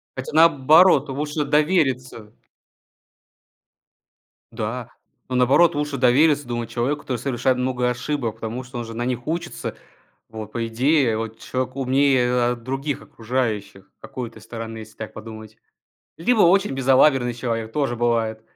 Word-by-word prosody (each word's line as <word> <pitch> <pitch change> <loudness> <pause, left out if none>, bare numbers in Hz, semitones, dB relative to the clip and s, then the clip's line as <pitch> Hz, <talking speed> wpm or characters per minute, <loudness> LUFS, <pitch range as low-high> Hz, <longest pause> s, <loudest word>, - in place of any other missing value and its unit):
Хотя, 130 - -6
наоборот, 155 -1 +5
лучше 150 +2 -2
довериться 135 - 0 2.2
Да. 115 +1 -4 0.4
Ну, 130 - -2
наоборот, 140 +7 +4
лучше 145 -1 -2
довериться, 140 +3 +3
думаю, 120 -1 -3
человеку, 125 +6 -2
который 130 -4 -3
совершает 130 +1 0
много 125 -1 0
ошибок, 125 -2 -3
потому 115 +3 -5
что 125 0 -9
он 120 - -4
же 115 - -8
на 120 +1 -3
них 125 -1 -3
учится. 170 +1 -4 0.5
Вот, 110 -1 -8
по 115 0 -2
идее, 125 0 +2
вот 115 0 -5
человек 130 0 -4
умнее, 135 -1 +2
а, 125 0 +1
других 135 +4 -4
окружающих 110 -5 -3
с - - -55
какой-то 120 -3 -7
стороны, 115 -1 -7
если 110 0 -12
так 110 - -7
подумать. 110 -1 -10 0.6
Либо 220 +6 +2
очень 195 +2 +4
безалаберный 130 -1 +3
человек 115 -2 -3
тоже 140 -5 0
бывает. 115 -2 0
125 Hz, 140 wpm, -22 LUFS, 115-140 Hz, 2.2 s, наоборот